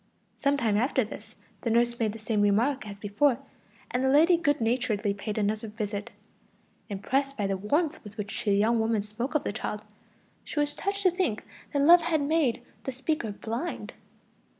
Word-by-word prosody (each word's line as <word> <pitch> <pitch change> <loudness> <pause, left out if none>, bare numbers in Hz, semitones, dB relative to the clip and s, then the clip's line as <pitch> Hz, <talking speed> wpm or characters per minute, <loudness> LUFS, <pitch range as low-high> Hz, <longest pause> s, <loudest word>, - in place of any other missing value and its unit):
Some 280 0 +1
time 220 -5 +1
after 255 +3 +2
this 215 - -10 0.3
the 235 - -1
nurse 235 +1 +2
made 220 -2 +1
the 220 - -8
same 215 -1 0
remark 220 +5 +2
as 200 -1 -7
before, 215 +6 +2 0.5
and 250 +1 0
the 265 - +3
lady 320 +6 +6
good 300 -3 +1
naturedly 225 -3 0
paid 205 +1 -5
another 215 +2 0
visit; 210 -1 -4 0.8
impressed 270 +8 -1
by 205 - 0
the 195 0 0
warmth 285 - 0
with 210 -1 -11
which 205 0 -4
the 205 - +2
young 225 +3 +3
woman 220 -2 +1
spoke 230 +8 -5
of 300 - +2
the - - -2
child, 210 0 -4 0.6
she - - -4
was 290 0 0
touched 400 0 -2
to 370 - +5
think 345 - -1 0.3
that 285 -1 +1
love 345 +3 +8
had 325 -3 +1
made 280 -5 +1 0.2
the 265 - -1
speaker 265 -3 -2
blind. 230 +10 -4
235 Hz, 185 wpm, -28 LUFS, 210-285 Hz, 0.8 s, love